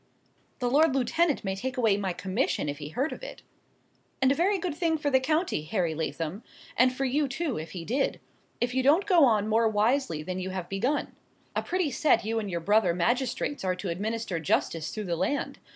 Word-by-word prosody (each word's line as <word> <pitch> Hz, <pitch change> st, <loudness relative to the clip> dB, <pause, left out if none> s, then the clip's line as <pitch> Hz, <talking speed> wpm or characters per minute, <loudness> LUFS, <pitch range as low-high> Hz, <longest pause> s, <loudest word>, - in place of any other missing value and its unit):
"The 250 Hz, -, -1 dB
lord 290 Hz, +3 st, +4 dB
lieutenant 295 Hz, +5 st, +1 dB
may 190 Hz, -1 st, -2 dB
take 255 Hz, +6 st, -4 dB
away 225 Hz, -5 st, +3 dB
my 195 Hz, -2 st, -2 dB
commission, 190 Hz, -, -1 dB
if 145 Hz, 0 st, -4 dB
he 145 Hz, -1 st, -6 dB
heard 270 Hz, -, -1 dB
of -, -, -10 dB
it." -, -, -9 dB, 0.8 s
"And 265 Hz, 0 st, +4 dB
a -, -, +5 dB
very 375 Hz, +7 st, +2 dB
good 355 Hz, -3 st, -3 dB
thing 325 Hz, 0 st, 0 dB
for 290 Hz, -1 st, -1 dB
the 260 Hz, -, +5 dB
county, 310 Hz, -, 0 dB
Harry 175 Hz, -3 st, 0 dB
Lathom; 160 Hz, +4 st, -3 dB, 0.3 s
and 255 Hz, +1 st, +5 dB
for 270 Hz, +2 st, -2 dB
you 285 Hz, +3 st, +1 dB
too, 270 Hz, -, -2 dB
if 155 Hz, 0 st, -8 dB
he 175 Hz, -3 st, -6 dB
did,—if 245 Hz, 0 st, -3 dB
you 260 Hz, -, +2 dB
don't 300 Hz, +9 st, +4 dB
go 350 Hz, -7 st, +6 dB
on 215 Hz, -4 st, +2 dB
more 225 Hz, +1 st, +3 dB
wisely 215 Hz, -, +1 dB
than 185 Hz, +3 st, -4 dB
you 185 Hz, 0 st, -3 dB
have 185 Hz, -2 st, -4 dB
begun. 240 Hz, +10 st, -1 dB, 0.4 s
A -, -, +1 dB
pretty 360 Hz, -5 st, -1 dB
set 290 Hz, -2 st, +2 dB
you 225 Hz, +1 st, 0 dB
and 210 Hz, -2 st, -4 dB
your 170 Hz, -2 st, -3 dB
brother 200 Hz, -1 st, +3 dB
magistrates 245 Hz, +8 st, 0 dB
are 185 Hz, -1 st, 0 dB
to 180 Hz, +1 st, -5 dB
administer 210 Hz, +1 st, -2 dB
justice 160 Hz, +1 st, 0 dB
through 215 Hz, -, -5 dB
the 175 Hz, -3 st, -2 dB
land! 190 Hz, -, -2 dB
230 Hz, 210 wpm, -28 LUFS, 185-280 Hz, 0.8 s, go